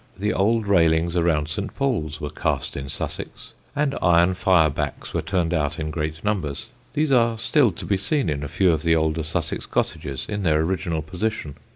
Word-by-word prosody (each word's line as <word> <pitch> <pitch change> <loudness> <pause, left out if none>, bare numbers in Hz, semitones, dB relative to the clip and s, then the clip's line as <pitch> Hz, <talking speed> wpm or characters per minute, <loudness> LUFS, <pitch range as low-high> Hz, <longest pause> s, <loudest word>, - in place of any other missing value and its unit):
The 105 +3 0
old 110 +3 +2
railings 85 -3 +3
around 80 -3 +2
St. 100 +7 -4
Paul's 80 - -1
were 75 -1 -4
cast - - -2
in 70 -1 -5
Sussex; - - -5 0.2
and 145 -1 +1
iron 85 +1 +4
fire 90 -4 +3
backs - - -4
were - - 0
turned 90 -3 0
out 75 -2 0
in 75 -1 -3
great 80 -1 -3
numbers. 90 -10 -2 0.3
These 150 -1 +1
are 115 -3 +3
still 125 +1 +3
to - - -8
be 100 - +1
seen 120 - 0
in 75 -2 -1
a 75 - -3
few 90 +5 +3
of 80 -2 0
the 80 0 +3
older 80 0 +1
Sussex 80 +1 -3
cottages 70 -1 -2
in 105 -1 -3
their 80 -4 +3
original 85 -2 -1
position. 90 -2 -3
85 Hz, 195 wpm, -23 LUFS, 75-105 Hz, 0.3 s, iron